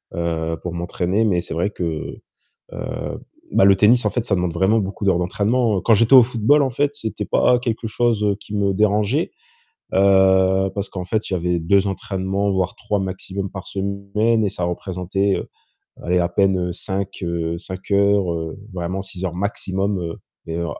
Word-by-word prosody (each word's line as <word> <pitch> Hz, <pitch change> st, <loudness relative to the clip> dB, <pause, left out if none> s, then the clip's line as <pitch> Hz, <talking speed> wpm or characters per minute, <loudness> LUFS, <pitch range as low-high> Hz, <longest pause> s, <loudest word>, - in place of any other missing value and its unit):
heu, 80 Hz, -1 st, -1 dB
pour 90 Hz, -1 st, -4 dB
m'entraîner. 90 Hz, +4 st, -1 dB
Mais 90 Hz, -5 st, +2 dB
c'est -, -, -7 dB
vrai 90 Hz, +5 st, -1 dB
que, 90 Hz, -, -5 dB, 0.9 s
heu -, -, -5 dB, 0.3 s
bah, -, -, +5 dB
le 100 Hz, -1 st, +6 dB
tennis 110 Hz, +4 st, +4 dB
en -, -, +3 dB
fait, 115 Hz, +2 st, -2 dB
ça 100 Hz, -, +1 dB
demande 90 Hz, -2 st, 0 dB
vraiment 95 Hz, +6 st, +3 dB
beaucoup 100 Hz, +1 st, -4 dB
d'heures 95 Hz, -3 st, +3 dB
d'entraînement. 105 Hz, +3 st, +1 dB
Quand 115 Hz, +5 st, +4 dB
j'étais 115 Hz, +5 st, +4 dB
au 125 Hz, -3 st, +10 dB
football 125 Hz, +5 st, +3 dB
en 135 Hz, -, +1 dB
fait, 145 Hz, +3 st, -1 dB
c'était 110 Hz, -5 st, -4 dB
pas 125 Hz, -, +3 dB
quelque 115 Hz, -2 st, -2 dB
chose, 110 Hz, -1 st, +1 dB
heu, 100 Hz, -1 st, +2 dB
qui 105 Hz, 0 st, -7 dB
me 100 Hz, -1 st, +1 dB
dérangeait, 105 Hz, -, +1 dB, 0.6 s
heu, 95 Hz, 0 st, +4 dB
parce 100 Hz, -1 st, -3 dB
qu'en 90 Hz, -1 st, -5 dB
fait, 110 Hz, +4 st, -2 dB
il -, -, 0 dB
y -, -, +1 dB
avait 90 Hz, 0 st, 0 dB
2 100 Hz, +4 st, +3 dB
entraînements 95 Hz, 0 st, -2 dB
voire 95 Hz, -1 st, -1 dB
3 105 Hz, -1 st, -2 dB
maximum 95 Hz, +1 st, -4 dB
par 95 Hz, -1 st, -8 dB
semaine 100 Hz, +3 st, 0 dB
et -, -, +2 dB
ça 90 Hz, -, -6 dB
représentait, 95 Hz, +2 st, -1 dB
heu, -, -, -5 dB, 0.5 s
allez, 90 Hz, +1 st, +1 dB
à 85 Hz, 0 st, +1 dB
peine, 95 Hz, +1 st, +2 dB
heu, -, -, -3 dB
5, 95 Hz, +1 st, -4 dB
heu, 85 Hz, -1 st, -2 dB
5 95 Hz, +2 st, -9 dB
heures, 100 Hz, -2 st, +3 dB
heu, 80 Hz, +2 st, -5 dB, 0.2 s
vraiment 90 Hz, +2 st, -3 dB
6 95 Hz, -1 st, -7 dB
heures 85 Hz, -2 st, -2 dB
maximum, 95 Hz, -2 st, -2 dB, 0.3 s
mais, 80 Hz, 0 st, -4 dB
heu, 85 Hz, 0 st, -2 dB
95 Hz, 190 wpm, -21 LUFS, 90-105 Hz, 0.9 s, au